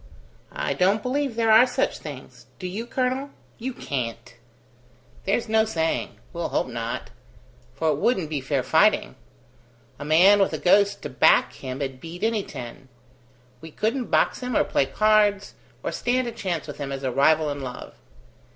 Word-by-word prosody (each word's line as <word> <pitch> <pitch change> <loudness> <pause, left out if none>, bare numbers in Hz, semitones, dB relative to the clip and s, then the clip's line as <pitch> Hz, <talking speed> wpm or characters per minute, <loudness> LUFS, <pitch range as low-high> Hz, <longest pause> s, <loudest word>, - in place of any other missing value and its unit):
"I - - -1
don't 200 +3 +2
believe 270 -1 -1
there 225 -1 +2
are 225 +4 +7
such 250 +2 -1
things. - - -10
Do 185 - -8
you, 205 +6 -4
colonel? 260 +3 -1 0.3
You 255 +3 -3
can't!" 120 - -5 0.9
"There's 205 +5 0
no 220 0 +3
saying. 165 -7 -2 0.2
We'll 170 -1 -3
hope - - 0
not; 115 -1 -5 0.6
for 160 - 0
it 150 - +1
wouldn't 190 - +1
be 150 -2 -3
fair 135 0 -1
fighting. 130 - +3 0.9
A - - -5
man 175 +7 +6
with 195 - +2
a - - -1
ghost 200 +2 +3
to 150 - -4
back 125 - +4
him'd 130 0 -6
beat 170 +4 -8
any 225 -1 +1
ten. 125 -5 -9 0.7
We 160 - -9
couldn't 225 - -2
box - - +2
him 250 -2 -2
or - - +4
play 135 - 0
cards, 210 +1 +2 0.3
or - - -2
stand 250 +1 0
a - - -3
chance 185 -8 -3
with - - -9
him 140 -1 -4
as 135 0 -5
a 130 - -1
rival 150 +3 +3
in 145 0 -5
love. 125 -2 -7
185 Hz, 170 wpm, -24 LUFS, 140-225 Hz, 0.9 s, are